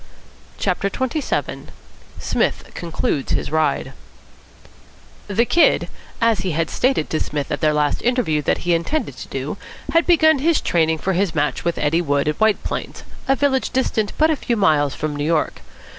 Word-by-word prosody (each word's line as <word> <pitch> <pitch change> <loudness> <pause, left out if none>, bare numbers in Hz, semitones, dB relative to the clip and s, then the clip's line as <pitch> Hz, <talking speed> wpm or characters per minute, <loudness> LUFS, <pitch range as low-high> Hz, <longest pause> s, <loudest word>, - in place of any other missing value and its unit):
CHAPTER 195 0 0
XXVII 260 +8 -2 0.5
PSMITH - - -1
CONCLUDES 160 -4 -2
HIS - - -2
RIDE 150 -4 0 1.3
The 215 +4 +2
Kid, 340 +7 +3 0.3
as 230 -3 +3
he 190 -3 -2
had 160 +1 -1
stated 255 - +1
to 155 - 0
Psmith 145 -2 -3
at 145 - -2
their 155 - +3
last 150 -1 0
interview 240 - +1
that 145 - -1
he 175 - +3
intended 170 - -1
to - - -8
do, - - -4 0.4
had 330 0 +3
begun 315 -4 +5
his 325 +3 +2
training 160 -2 +1
for 190 +4 -1
his 185 -2 0
match 150 0 0
with 170 -1 -1
Eddie 155 +3 +1
Wood, 145 -3 0
at 150 - -1
White 220 -1 +2
Plains, - - -5 0.2
a 270 - +4
village 270 -1 +1
distant 220 -5 0
but 315 +1 +4
a - - +2
few 240 -4 -2
miles 150 -8 +2
from 150 -1 -3
New 145 - -3
York. 160 +1 0
175 Hz, 175 wpm, -20 LUFS, 150-250 Hz, 1.3 s, begun